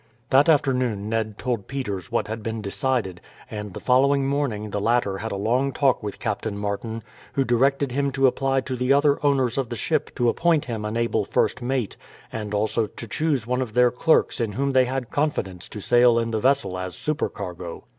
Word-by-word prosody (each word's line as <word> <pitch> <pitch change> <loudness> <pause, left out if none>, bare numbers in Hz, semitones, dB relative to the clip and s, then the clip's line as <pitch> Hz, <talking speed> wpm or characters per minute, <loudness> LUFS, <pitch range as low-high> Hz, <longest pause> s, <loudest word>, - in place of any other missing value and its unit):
That 140 +5 +5
afternoon 125 -8 +1
Ned 110 -2 -2
told 120 -6 -3
Peters 115 -9 -4
what 115 - 0
had 110 +1 -5
been 110 +1 -3
decided, 105 - -1 0.3
and 105 -1 -5
the - - -5
following 135 +2 +3
morning 135 -7 -1
the 105 - -2
latter 105 -3 +1
had 110 +2 -4
a - - -2
long 120 +7 +1
talk 135 -2 +2
with 105 -2 -5
Captain 105 -2 -3
Martin, 105 +2 -4 0.3
who 135 - +2
directed 135 +2 +2
him 140 +2 0
to 135 0 +2
apply 135 +1 +2
to 130 0 -4
the 125 +1 0
other 145 +1 +3
owners 135 -3 +2
of 130 -4 -2
the 120 - -4
ship 155 +6 -1
to 120 -2 +1
appoint 165 +4 +2
him 115 -3 -4
an 105 +2 -2
able 115 0 +1
first - - 0
mate, 125 -3 -2 0.4
and 105 -2 -4
also 110 +2 0
to 115 +2 -9
choose 145 -2 0
one 125 +2 0
of 115 -4 -5
their 125 0 +5
clerks 145 0 +2
in 110 -3 -1
whom 140 +5 0
they 130 -1 +4
had 125 -1 -3
confidence 100 - -2
to 105 - -5
sail 120 +2 +4
in 115 0 0
the 110 - 0
vessel 115 -7 +1
as 90 -1 -5
supercargo. 90 - -4
120 Hz, 205 wpm, -24 LUFS, 105-135 Hz, 0.4 s, That